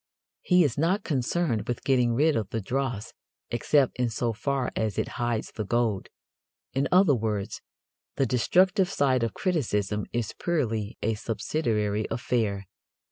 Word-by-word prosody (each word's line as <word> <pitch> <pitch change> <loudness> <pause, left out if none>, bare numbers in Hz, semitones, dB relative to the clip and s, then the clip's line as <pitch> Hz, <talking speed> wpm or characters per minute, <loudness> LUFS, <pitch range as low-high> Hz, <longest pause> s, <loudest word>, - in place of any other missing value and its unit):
He 180 -1 +4
is 140 -2 0
not 185 +6 +2
concerned 135 - 0
with 120 - -3
getting 125 -3 +2
rid 150 +4 +3
of 110 -4 -1
the 115 - -2
dross 120 0 -3 0.4
except 130 +3 +2
in 125 -1 +2
so 115 +1 -1
far 135 +3 -1
as 110 -2 -1
it - - -1
hides 120 -2 -1
the 110 - -4
gold. 110 -2 0 0.6
In 135 +1 +1
other 180 -4 +6
words, 105 -4 -2 0.5
the 135 - +2
destructive 180 - +3
side 135 -8 +2
of 115 -2 -1
criticism 105 - -1
is 120 -3 -2
purely 115 - -1
a 115 - +1
subsidiary 110 -2 -1
affair. 110 -5 -1
120 Hz, 145 wpm, -27 LUFS, 110-145 Hz, 0.6 s, other